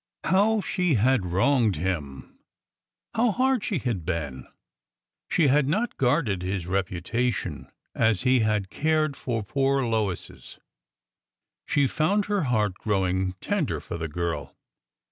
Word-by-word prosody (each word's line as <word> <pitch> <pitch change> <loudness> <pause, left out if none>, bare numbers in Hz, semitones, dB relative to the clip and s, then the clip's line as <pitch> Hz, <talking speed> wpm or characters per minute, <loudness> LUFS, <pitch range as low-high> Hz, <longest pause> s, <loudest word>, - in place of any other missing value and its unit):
How 205 +4 +3
she 180 -6 0
had 120 -3 +2
wronged 110 +3 +2
him 75 -6 -4 0.7
I - - -10
How 240 -1 +4
hard 260 -1 +1
she 205 - -1
had 120 - -2
been! 75 -7 -4 0.8
She 165 - +3
had 140 0 +3
not 215 +11 0
guarded 125 - +1
his 90 -1 -3
reputation 95 +6 -2 0.2
as 110 -5 +2
he 130 0 +4
had 105 -3 0
cared 155 -1 +1
for 115 -5 -3
poor 135 +4 +1
Lois's. 110 -6 -3 1.1
She 145 - +3
found 190 +9 +1
her 205 -5 0
heart 105 -6 0
growing 95 -2 0
tender 200 -8 -1
for 85 - -7
the 80 - -2
girl. 85 +1 -4
115 Hz, 130 wpm, -26 LUFS, 95-155 Hz, 1.1 s, How